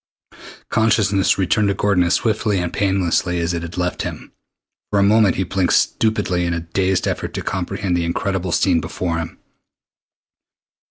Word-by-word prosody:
Consciousness 105 -3 +2
returned 100 +3 +1
to 100 - 0
Gordon 100 -3 +2
as 85 - +2
swiftly 110 -3 0
and 90 -1 -2
painlessly 95 -3 0
as 85 +1 -1
it 85 - -2
had 85 +1 -8
left 90 0 -1
him. - - -6 0.6
For 105 - 0
a 100 - +4
moment 105 -2 +4
he 95 - 0
blinked 95 0 0
stupidly 105 -5 +1
in 85 0 -1
a - - -2
dazed 95 +3 0
effort - - -3
to - - -3
comprehend 95 -3 -2
the 85 -1 0
incredible 95 +1 -2
scene 85 -1 +2
before 85 +2 -3
him. 80 0 -6
95 Hz, 165 wpm, -20 LUFS, 85-100 Hz, 0.6 s, a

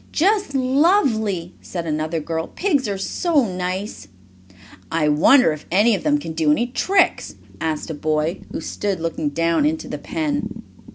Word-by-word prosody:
"Just 395 -2 +1
lovely!" 255 - +2
said 170 -2 -5
another 155 +1 -2
girl. 160 +1 -3
"Pigs 295 - 0
are 200 -1 -2
so 290 - +1
nice!" 185 - -4 0.8
"I 160 -2 +1
wonder 160 - +5
if 150 - -10
any 210 +6 +4
of 200 - -1
them 295 -1 +2
can 165 - -6
do 160 -1 +1
any 220 +11 +3
tricks?" 370 +9 +1 0.3
asked 160 0 -2
a - - -3
boy 155 +3 -1
who - - -4
stood 200 -3 -3
looking 160 -2 -2
down 165 - +1
into 310 +1 -1
the - - -5
pen. 295 -3 -3
195 Hz, 160 wpm, -21 LUFS, -, 0.8 s, wonder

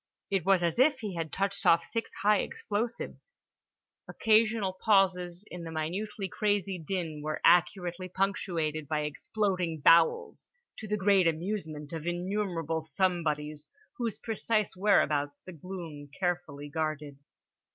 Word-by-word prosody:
It 195 -4 +1
was 190 -3 +4
as 170 +5 0
if 265 -1 +4
he 210 -3 -4
had 165 -3 -4
touched 200 0 -2
off 170 0 +5
six 230 0 -4
high 210 -1 +5
explosives. 235 - -4 0.8
Occasional 215 -3 +2
pauses 185 -3 +2
in 180 - -6
the 165 - -6
minutely 190 +6 -3
crazy 200 -2 -1
din 160 -2 -3
were 155 +1 -3
accurately 180 0 +3
punctuated 170 -5 -1
by 150 0 0
exploding 175 +2 -1
bowels; 165 +3 +4 0.3
to 215 - -7
the 210 +1 0
great 195 -2 +4
amusement 160 -3 -3
of 165 0 -5
innumerable 175 -3 -1
somebodies, 155 -2 -1 0.3
whose 230 -3 -1
precise 220 -2 -1
whereabouts 145 -8 +2
the 185 - -8
gloom 165 -4 -8
carefully 175 -6 -2
guarded. 150 -2 -3
180 Hz, 130 wpm, -30 LUFS, 155-200 Hz, 0.8 s, off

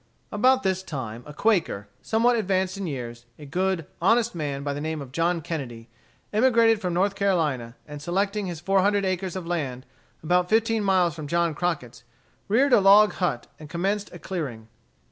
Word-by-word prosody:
About 255 +5 +3
this 190 -1 0
time 125 -10 -6
a - - -8
Quaker, 165 - 0
somewhat 235 +2 +2
advanced 190 -3 0
in 195 -2 -4
years, 120 -4 -6
a 150 - -11
good, 180 +2 -1 0.2
honest 230 +5 +3
man, 145 -4 -4
by 145 0 -2
the 145 - -5
name 160 0 -3
of 135 -3 -8
John 170 +3 0
Kennedy, 125 -8 -6 0.4
emigrated 230 -1 +4
from 180 -2 -2
North 195 +3 +2
Carolina, 155 -12 0
and 150 -1 -8
selecting 195 +5 -1
his 170 -3 -5
four 195 +3 +2
hundred 200 0 +2
acres 185 -1 -2
of 185 -2 -5
land 140 -7 -3 0.4
about 180 +2 +2
fifteen 225 0 +2
miles 185 -4 +2
from 155 -1 -7
John 170 +1 +1
Crockett's, 125 -8 -3 0.4
reared 255 +6 +3
a 215 - +6
log 205 +2 +6
hut 150 -10 -1
and 155 -1 -11
commenced 195 +5 -2
a - - -9
clearing. 140 -13 -5
180 Hz, 180 wpm, -25 LUFS, 145-200 Hz, 0.4 s, a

